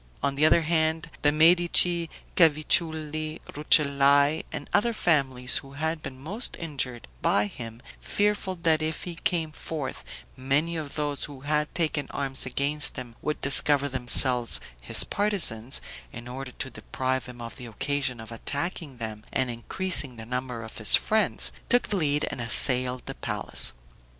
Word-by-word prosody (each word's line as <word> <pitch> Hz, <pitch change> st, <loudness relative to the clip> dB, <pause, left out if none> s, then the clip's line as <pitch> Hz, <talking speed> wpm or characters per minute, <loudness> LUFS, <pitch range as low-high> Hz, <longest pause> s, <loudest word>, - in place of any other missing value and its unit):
On 140 Hz, -1 st, +1 dB
the 150 Hz, +3 st, +3 dB
other 165 Hz, +1 st, +4 dB
hand, 160 Hz, 0 st, 0 dB
the 145 Hz, -, +3 dB
Medici, 170 Hz, +1 st, +5 dB, 0.3 s
Cavicciulli, 155 Hz, -1 st, +1 dB
Rucellai, 145 Hz, 0 st, +4 dB
and -, -, -6 dB
other 235 Hz, +3 st, +3 dB
families 135 Hz, -, +1 dB
who 135 Hz, 0 st, -9 dB
had 160 Hz, +2 st, -3 dB
been 130 Hz, -3 st, -8 dB
most 200 Hz, -, -4 dB
injured 135 Hz, -7 st, -4 dB
by 105 Hz, -, +2 dB
him, 115 Hz, +2 st, -9 dB, 0.2 s
fearful 205 Hz, -2 st, -1 dB
that 160 Hz, -1 st, +3 dB
if 155 Hz, 0 st, -3 dB
he 175 Hz, -, -6 dB
came 165 Hz, -1 st, -1 dB
forth, 155 Hz, -2 st, -6 dB, 0.3 s
many 140 Hz, +6 st, 0 dB
of 155 Hz, -3 st, -6 dB
those 145 Hz, -2 st, -2 dB
who 140 Hz, -3 st, -11 dB
had 150 Hz, +1 st, -1 dB
taken 155 Hz, -4 st, -1 dB
arms 135 Hz, -2 st, -1 dB
against 145 Hz, +3 st, +1 dB
him 120 Hz, -2 st, -7 dB
would 150 Hz, -, -3 dB
discover 140 Hz, 0 st, +4 dB
themselves 125 Hz, -2 st, +3 dB, 0.2 s
his -, -, +3 dB
partisans, 170 Hz, -, 0 dB, 0.3 s
in 120 Hz, +1 st, -9 dB
order 130 Hz, 0 st, -7 dB
to 130 Hz, -, -6 dB
deprive 130 Hz, -1 st, -3 dB
him 125 Hz, -1 st, -11 dB
of 115 Hz, -1 st, -8 dB
the 125 Hz, -3 st, -9 dB
occasion 130 Hz, +2 st, -2 dB
of 110 Hz, +1 st, -10 dB
attacking 145 Hz, +4 st, -4 dB
them 110 Hz, -2 st, -6 dB
and 130 Hz, -2 st, 0 dB
increasing 140 Hz, +3 st, +1 dB
the 110 Hz, -1 st, -9 dB
number 125 Hz, -1 st, -4 dB
of 110 Hz, -, -10 dB
his 110 Hz, -, +7 dB
friends, 220 Hz, 0 st, +1 dB, 0.2 s
took 245 Hz, 0 st, +2 dB
the 205 Hz, -, 0 dB
lead 150 Hz, -3 st, +1 dB
and 125 Hz, -, -6 dB
assailed 125 Hz, +2 st, +3 dB
the -, -, -6 dB
palace. -, -, -2 dB
145 Hz, 155 wpm, -26 LUFS, 125-160 Hz, 0.3 s, his